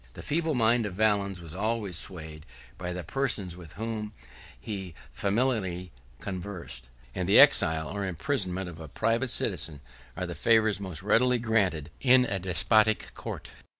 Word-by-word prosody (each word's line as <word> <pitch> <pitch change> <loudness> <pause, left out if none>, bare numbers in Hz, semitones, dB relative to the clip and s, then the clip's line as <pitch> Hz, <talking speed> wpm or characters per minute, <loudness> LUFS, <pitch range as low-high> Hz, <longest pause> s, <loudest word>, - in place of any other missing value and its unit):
67 - - -10
The - - -8
feeble 160 0 0
mind 115 -1 +3
of 90 - -7
Valens 100 -3 +1
was 80 -2 -8
always 105 -1 -1
swayed 80 -4 +1 0.3
by 90 -1 -4
the 90 0 -5
persons 100 - -1
with 85 -4 -12
whom 110 -1 -4 0.5
he 95 - -6 0.2
familiarly 100 -5 -1 0.3
conversed; 90 -10 -5 0.2
and 90 0 -3
the - - +7
exile 80 0 +6
or 100 0 -4
imprisonment 95 - -2
of 85 -2 -9
a 80 - -8
private 115 - 0
citizen 80 -10 0 0.4
are 90 - -2
the 85 - -5
favors 110 -1 +3
the 100 - -8
most 90 -2 -5
readily 125 +4 +3
granted 100 -10 0
in 130 -1 +5
a 100 -4 -2
despotic 110 +4 +2
court. - - -7
100 Hz, 160 wpm, -28 LUFS, 90-115 Hz, 0.5 s, the